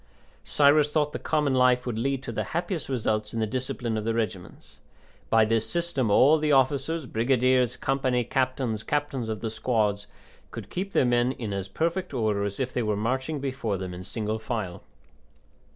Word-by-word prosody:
Cyrus 150 Hz, +1 st, +4 dB
thought 150 Hz, -1 st, +1 dB
the -, -, -3 dB
common 150 Hz, -3 st, 0 dB
life 125 Hz, -1 st, +3 dB
would 115 Hz, -3 st, -3 dB
lead 135 Hz, +2 st, -1 dB
to -, -, -5 dB
the -, -, -2 dB
happiest 175 Hz, -4 st, -3 dB
results 110 Hz, -4 st, -1 dB
in -, -, -1 dB
the 110 Hz, -, +1 dB
discipline 120 Hz, -1 st, -3 dB
of -, -, -5 dB
the 115 Hz, +1 st, -1 dB
regiments. 105 Hz, -6 st, -5 dB, 0.5 s
By 115 Hz, -1 st, +5 dB
this 115 Hz, 0 st, 0 dB
system 170 Hz, -9 st, -1 dB
all 140 Hz, +9 st, +5 dB
the 150 Hz, 0 st, +1 dB
officers 140 Hz, +3 st, +2 dB
brigadiers, 125 Hz, +1 st, +2 dB
company 130 Hz, -2 st, 0 dB
captains, 130 Hz, -3 st, -1 dB
captains 135 Hz, -1 st, -2 dB
of 110 Hz, -1 st, -4 dB
the 110 Hz, -, -3 dB
squads 105 Hz, -3 st, 0 dB, 0.4 s
could -, -, -9 dB
keep 195 Hz, +2 st, -4 dB
their -, -, +4 dB
men 120 Hz, +1 st, +2 dB
in 110 Hz, -6 st, -5 dB
as 100 Hz, -1 st, -3 dB
perfect 170 Hz, -1 st, -2 dB
order 110 Hz, -4 st, 0 dB
as 100 Hz, -1 st, -4 dB
if 130 Hz, -1 st, -2 dB
they 125 Hz, -, 0 dB
were 105 Hz, -2 st, 0 dB
marching 130 Hz, +7 st, -1 dB
before 130 Hz, -7 st, -2 dB
them 95 Hz, -1 st, -5 dB
in 90 Hz, +1 st, -7 dB
single 110 Hz, +2 st, -3 dB
file. 110 Hz, -6 st, -4 dB
125 Hz, 185 wpm, -26 LUFS, 110-135 Hz, 0.5 s, By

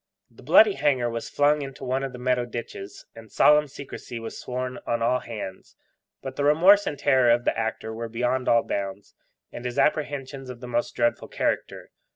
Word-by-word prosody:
The 115 Hz, -, -17 dB
bloody 185 Hz, -, +6 dB
hanger 135 Hz, -6 st, +1 dB
was 115 Hz, 0 st, -5 dB
flung 145 Hz, +1 st, +2 dB
into 135 Hz, -1 st, -8 dB
one 130 Hz, +1 st, -1 dB
of 135 Hz, -, -3 dB
the 125 Hz, -, -9 dB
Meadow 125 Hz, 0 st, 0 dB
ditches, 115 Hz, -4 st, -8 dB
and 110 Hz, -2 st, -13 dB
solemn 150 Hz, 0 st, +5 dB
secrecy 135 Hz, -3 st, -9 dB
was 115 Hz, 0 st, -7 dB
sworn 125 Hz, 0 st, -5 dB
on 115 Hz, -1 st, 0 dB
all 125 Hz, +2 st, +2 dB
hands; 105 Hz, -6 st, -8 dB, 0.5 s
but 135 Hz, -1 st, -7 dB
the 145 Hz, -, -1 dB
remorse 180 Hz, +8 st, +5 dB
and 145 Hz, -, -3 dB
terror 130 Hz, -3 st, +3 dB
of 120 Hz, +1 st, +3 dB
the -, -, +1 dB
actor 110 Hz, 0 st, -3 dB
were 115 Hz, +1 st, -5 dB
beyond 125 Hz, +3 st, -1 dB
all 115 Hz, -1 st, +4 dB
bounds, 100 Hz, 0 st, -5 dB, 0.4 s
and 120 Hz, -, -8 dB
his 125 Hz, -1 st, -4 dB
apprehensions 140 Hz, -3 st, -1 dB
of 125 Hz, -2 st, -8 dB
the 125 Hz, -, -8 dB
most 120 Hz, 0 st, -2 dB
dreadful 120 Hz, 0 st, 0 dB
character. -, -, -3 dB
125 Hz, 190 wpm, -25 LUFS, 115-140 Hz, 0.5 s, bloody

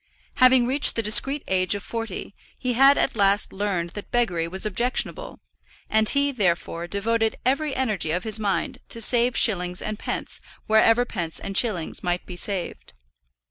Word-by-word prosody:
Having 255 Hz, -1 st, +6 dB
reached 270 Hz, +4 st, +3 dB
the 230 Hz, -, 0 dB
discreet 270 Hz, +7 st, +3 dB
age 185 Hz, +1 st, +1 dB
of 205 Hz, -, -6 dB
forty, 225 Hz, -3 st, -5 dB, 0.2 s
he 250 Hz, -1 st, -2 dB
had 275 Hz, +3 st, +6 dB
at -, -, 0 dB
last 200 Hz, -1 st, +2 dB
learned 190 Hz, -4 st, -2 dB
that 205 Hz, -, -9 dB
beggary 180 Hz, -9 st, 0 dB
was 190 Hz, +4 st, -3 dB
objectionable; 245 Hz, -, -3 dB, 0.5 s
and 220 Hz, 0 st, +4 dB
he, 280 Hz, 0 st, +1 dB
therefore, 175 Hz, -6 st, -1 dB
devoted 220 Hz, +4 st, -1 dB
every 275 Hz, +2 st, 0 dB
energy 215 Hz, -11 st, -1 dB
of 175 Hz, +3 st, -1 dB
his 220 Hz, -1 st, 0 dB
mind 200 Hz, -3 st, -2 dB
to 230 Hz, -, -1 dB
saving 240 Hz, +2 st, +1 dB
shillings 180 Hz, -4 st, +1 dB
and 215 Hz, 0 st, -4 dB
pence -, -, -4 dB, 0.2 s
wherever 225 Hz, +2 st, +4 dB
pence 170 Hz, -8 st, -5 dB
and 195 Hz, -, -6 dB
shillings 195 Hz, -8 st, 0 dB
might 175 Hz, 0 st, -2 dB
be 180 Hz, -, -8 dB
saved. 175 Hz, -, -5 dB
215 Hz, 165 wpm, -24 LUFS, 185-240 Hz, 0.5 s, Having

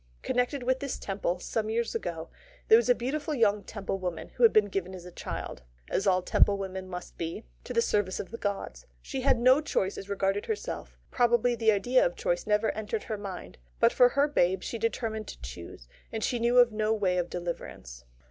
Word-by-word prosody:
Connected 250 Hz, +2 st, 0 dB
with 260 Hz, +1 st, +1 dB
this 280 Hz, -2 st, -3 dB
Temple, 190 Hz, -3 st, -2 dB
some 215 Hz, +4 st, -2 dB
years 230 Hz, +1 st, -1 dB
ago, 170 Hz, -7 st, -4 dB, 0.4 s
there -, -, +9 dB
was 235 Hz, +1 st, +1 dB
a 245 Hz, -, +6 dB
beautiful 295 Hz, +5 st, -2 dB
young 210 Hz, -4 st, +2 dB
Temple 195 Hz, -1 st, -4 dB
woman, 180 Hz, -3 st, -4 dB
who -, -, -10 dB
had 230 Hz, -, +8 dB
been 215 Hz, -1 st, +5 dB
given 190 Hz, -2 st, -3 dB
as 180 Hz, -1 st, -10 dB
a 180 Hz, -, -9 dB
child 65 Hz, -, -6 dB, 0.3 s
as 195 Hz, -, 0 dB
all 185 Hz, -1 st, +3 dB
Temple 200 Hz, +2 st, +3 dB
women 190 Hz, -1 st, -5 dB
must 180 Hz, -1 st, -8 dB
be 165 Hz, 0 st, -4 dB, 0.2 s
to -, -, -7 dB
the 230 Hz, -, +2 dB
service 205 Hz, -4 st, 0 dB
of 190 Hz, -, -6 dB
the 230 Hz, -, -7 dB
gods. 205 Hz, -, -4 dB, 0.2 s
She 270 Hz, -2 st, -4 dB
had 265 Hz, -1 st, +3 dB
no 255 Hz, +5 st, +5 dB
choice 195 Hz, -10 st, -1 dB
as 195 Hz, -, -10 dB
regarded 200 Hz, 0 st, 0 dB
herself 440 Hz, -1 st, -4 dB
probably 240 Hz, 0 st, +3 dB
the 225 Hz, -2 st, +3 dB
idea 245 Hz, +5 st, +3 dB
of -, -, 0 dB
choice -, -, -1 dB
never 210 Hz, +1 st, +2 dB
entered 215 Hz, 0 st, -4 dB
her 215 Hz, -, -4 dB
mind 195 Hz, -, -8 dB, 0.2 s
but -, -, +5 dB
for 250 Hz, -1 st, +6 dB
her 280 Hz, +3 st, +2 dB
babe 190 Hz, -10 st, +1 dB
she 230 Hz, -, -4 dB
determined 220 Hz, -1 st, -2 dB
to -, -, -9 dB
choose; 60 Hz, -1 st, -9 dB, 0.2 s
and 220 Hz, -1 st, -3 dB
yet -, -, +2 dB
she 245 Hz, -, -1 dB
knew 240 Hz, +2 st, +2 dB
of 245 Hz, -1 st, +7 dB
no 215 Hz, 0 st, 0 dB
way 185 Hz, -4 st, +1 dB
of 175 Hz, -, -2 dB
deliverance. 170 Hz, -, -6 dB
215 Hz, 215 wpm, -29 LUFS, 190-245 Hz, 0.4 s, there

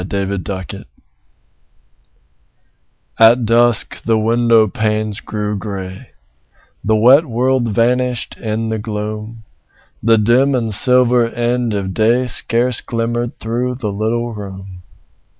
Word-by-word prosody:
FORGIVENESS 95 Hz, -1 st, -4 dB, 2.3 s
At 115 Hz, +2 st, +5 dB
dusk 120 Hz, 0 st, +2 dB
the 115 Hz, -1 st, +1 dB
window 115 Hz, 0 st, +3 dB
panes 110 Hz, 0 st, -2 dB
grew 105 Hz, -1 st, -4 dB
grey; 95 Hz, -2 st, -7 dB, 0.7 s
The 110 Hz, -, +1 dB
wet 130 Hz, +8 st, +5 dB
world 125 Hz, +1 st, 0 dB
vanished 125 Hz, +3 st, 0 dB
in 110 Hz, 0 st, -3 dB
the 110 Hz, 0 st, -2 dB
gloom; 105 Hz, +1 st, -6 dB, 0.6 s
The 115 Hz, 0 st, +3 dB
dim 125 Hz, +6 st, +2 dB
and 115 Hz, -3 st, -1 dB
silver 125 Hz, +1 st, +3 dB
end 120 Hz, -1 st, -1 dB
of 95 Hz, -2 st, -3 dB
day 115 Hz, +4 st, +2 dB
Scarce 125 Hz, 0 st, +1 dB
glimmered 120 Hz, +1 st, -3 dB
through 120 Hz, +3 st, -3 dB
the 115 Hz, -5 st, -4 dB
little 115 Hz, +3 st, -2 dB
room. 95 Hz, -3 st, -9 dB
115 Hz, 110 wpm, -16 LUFS, 105-120 Hz, 2.3 s, At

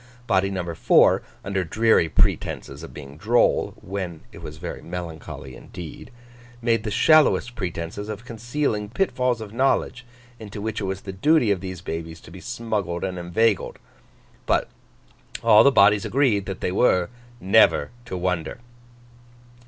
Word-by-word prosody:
Body 95 Hz, -3 st, +2 dB
number 90 Hz, -3 st, -4 dB
four, -, -, +4 dB, 0.2 s
under 100 Hz, -1 st, -1 dB
dreary 110 Hz, -1 st, +2 dB
pretences 70 Hz, -2 st, 0 dB
of 80 Hz, -, -9 dB
being 70 Hz, -1 st, -11 dB
droll 115 Hz, +8 st, +2 dB
(when 90 Hz, -4 st, -5 dB
it -, -, -12 dB
was 75 Hz, 0 st, -8 dB
very 85 Hz, +2 st, -6 dB
melancholy 80 Hz, -6 st, -7 dB
indeed), 85 Hz, -3 st, -10 dB, 0.5 s
made 115 Hz, -2 st, +1 dB
the 110 Hz, -, -3 dB
shallowest 140 Hz, 0 st, +4 dB
pretences 95 Hz, 0 st, -5 dB
of 110 Hz, +2 st, -6 dB
concealing 115 Hz, -2 st, -2 dB
pitfalls 125 Hz, -, 0 dB
of 105 Hz, -1 st, -8 dB
knowledge, 130 Hz, 0 st, 0 dB, 0.4 s
into 105 Hz, -1 st, -8 dB
which 110 Hz, +1 st, -3 dB
it -, -, -2 dB
was 95 Hz, 0 st, -3 dB
the 95 Hz, -, -7 dB
duty 125 Hz, +3 st, +3 dB
of 95 Hz, -3 st, 0 dB
these 95 Hz, -2 st, -6 dB
babies 80 Hz, -1 st, -6 dB
to 85 Hz, -, -15 dB
be 95 Hz, +1 st, -11 dB
smuggled 105 Hz, -7 st, -3 dB
and 90 Hz, -1 st, -3 dB
inveigled. 100 Hz, +5 st, 0 dB, 0.7 s
But, -, -, +1 dB, 0.7 s
all 105 Hz, +1 st, +7 dB
the 140 Hz, -, +6 dB
bodies 100 Hz, -4 st, +5 dB
agreed 120 Hz, -8 st, +1 dB
that 95 Hz, -1 st, -5 dB
they -, -, -1 dB
were 90 Hz, -3 st, +2 dB, 0.3 s
never 95 Hz, -6 st, +4 dB
to 95 Hz, -6 st, -5 dB
wonder. 90 Hz, -2 st, -2 dB
100 Hz, 150 wpm, -23 LUFS, 90-115 Hz, 0.7 s, all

